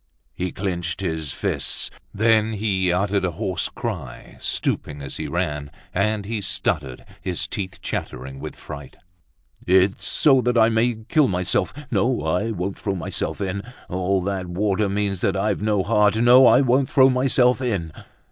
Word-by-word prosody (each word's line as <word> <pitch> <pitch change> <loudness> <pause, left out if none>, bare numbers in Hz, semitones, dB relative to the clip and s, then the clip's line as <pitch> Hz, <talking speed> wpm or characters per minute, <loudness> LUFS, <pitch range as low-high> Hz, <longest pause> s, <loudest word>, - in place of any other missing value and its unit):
He 90 0 -3
clinched 90 -2 -3
his 80 -5 -2
fists; - - -2 0.2
then 110 +1 +3
he 95 -4 0
uttered 100 +2 +1
a 90 - +1
hoarse 80 - -2
cry, - - -6
stooping 75 0 -2
as 70 -2 -7
he - - -4
ran. 75 -1 -2 0.2
And 105 +1 0
he 110 0 -3
stuttered, 75 -8 -2 0.2
his 90 -2 -1
teeth 95 -2 -5
chattering 65 +2 -5
with 75 +2 -7
fright. 70 -2 -10 0.7
"It's 95 +2 +3
so 135 -4 +4
that 125 0 +1
I 110 0 +6
may 115 +1 +2
kill 150 +2 +4
myself. 90 -1 0 0.2
No, 125 0 +1
I 90 +8 0
won't 100 -2 -3
throw 100 -2 -2
myself 90 - -3
in! 100 0 -2 0.3
All 95 +1 0
that 95 -1 -2
water 100 +3 0
means 100 -2 -1
that 100 0 +1
I've 100 0 0
no 105 -2 +1
heart. 105 0 +3
No, 120 +3 +7
I 130 - +6
won't 130 +1 +2
throw 130 -1 +5
myself 125 0 +3
in!" 100 -11 -1
100 Hz, 160 wpm, -23 LUFS, 90-110 Hz, 0.7 s, No